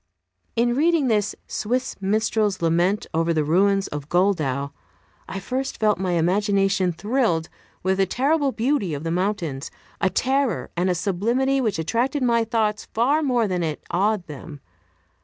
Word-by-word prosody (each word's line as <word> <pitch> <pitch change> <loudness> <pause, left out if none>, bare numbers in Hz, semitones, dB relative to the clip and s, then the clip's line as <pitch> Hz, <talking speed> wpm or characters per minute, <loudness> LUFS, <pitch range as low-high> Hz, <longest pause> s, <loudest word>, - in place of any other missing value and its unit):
In 240 +1 +2
reading 310 -2 +2
this, 210 -2 +1
"Swiss 250 +4 -2
Minstrel's 210 0 +1
Lament 175 +5 +1
over 165 +1 +1
the 155 - +2
Ruins 195 +5 +2
of 145 0 -6
Goldau," 155 -7 +1 0.6
I 195 - -4
first 260 +7 -3
felt 210 -4 +2
my 185 -2 -1
imagination 195 +2 +2
thrilled 200 -3 0 0.3
with 190 +1 +1
the 195 - +3
terrible 280 - +1
beauty 230 - 0
of 145 - -6
the 165 - -2
mountains 175 -7 -2 0.3
a 195 - +3
terror 265 +3 0
and 180 +2 +1
a 180 - +1
sublimity 235 +10 +1
which 215 -8 0
attracted 245 - 0
my 235 -2 +3
thoughts 215 -2 -1
far 270 +8 +3
more 245 -6 +1
than 180 -2 -1
it 155 -3 -3
awed 200 +1 +1
them. 150 0 -9
200 Hz, 155 wpm, -23 LUFS, 175-240 Hz, 0.6 s, the